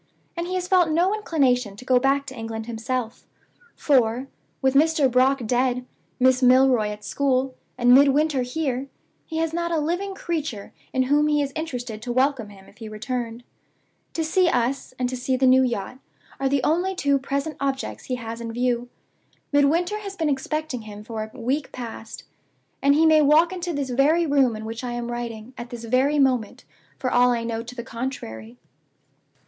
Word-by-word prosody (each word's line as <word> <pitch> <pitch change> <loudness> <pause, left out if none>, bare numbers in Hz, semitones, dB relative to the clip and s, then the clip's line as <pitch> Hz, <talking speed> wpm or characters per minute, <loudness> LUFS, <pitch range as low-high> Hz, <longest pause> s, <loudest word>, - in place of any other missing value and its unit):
And 340 0 -3
he 370 - -3
has 365 -1 -2
felt 360 -3 +4
no 345 +5 +2
inclination 255 - +1
to 250 - -12
go 255 -1 +4
back 275 +2 +1
to 265 -2 -8
England 225 -1 -5
himself; 235 +1 -4 0.5
for, 250 -3 +2 0.3
with 265 -1 +2
Mr. 300 -1 +3
Brock 255 0 +3
dead, 250 +2 0 0.3
Miss 255 0 +4
Milroy 255 -3 +5
at 210 0 -7
school, 265 0 0 0.2
and 245 0 +5
Midwinter 285 +1 +4
here, 265 0 -2 0.4
he 320 - -5
has 325 0 -1
not 340 0 -1
a 330 - +1
living 355 +6 -2
creature 305 - -4 0.2
in 260 - +1
whom 290 +3 +3
he 300 -1 +2
is 280 -1 -1
interested 250 -9 -5
to 240 - -4
welcome 255 -3 +1
him 195 -1 -15
if - - -20
he 220 -2 -7
returned. 235 +1 -4 0.7
To 325 - 0
see 345 +3 +3
us, 250 +1 -1
and 250 - 0
to 255 - -4
see 255 +1 -1
the 260 - +2
new 260 0 +6
yacht, 240 -1 -2 0.4
are 270 0 +1
the 275 -2 +1
only 355 +6 +1
two 280 -5 +2
present 280 +3 -3
objects 275 -1 -3
he 255 - -2
has 230 -1 -6
in 230 -1 -5
view. 245 0 -1 0.6
Midwinter 330 +8 +2
has 400 -2 -7
been 320 -5 0
expecting 285 -1 -2
him 210 -1 -10
for 220 -1 -5
a 265 - -13
week 265 +5 -1
past, 230 -2 -8 0.6
and 280 +1 +4
he 320 +2 +4
may 315 -1 +6
walk 310 +5 +4
into 355 -1 -3
this 280 -4 -3
very 300 +7 +3
room 275 -6 +3
in 215 0 -7
which 225 +2 -6
I 245 -1 -3
am 240 0 -4
writing, 235 0 -6
at 240 0 -7
this 240 -2 -8
very 260 +6 +2
moment, 255 -6 +1 0.3
for 255 - -2
all 245 0 +5
I 235 -1 0
know 230 -1 -3
to 240 +2 -10
the 235 - -5
contrary. 125 - -6
260 Hz, 190 wpm, -24 LUFS, 240-295 Hz, 0.7 s, new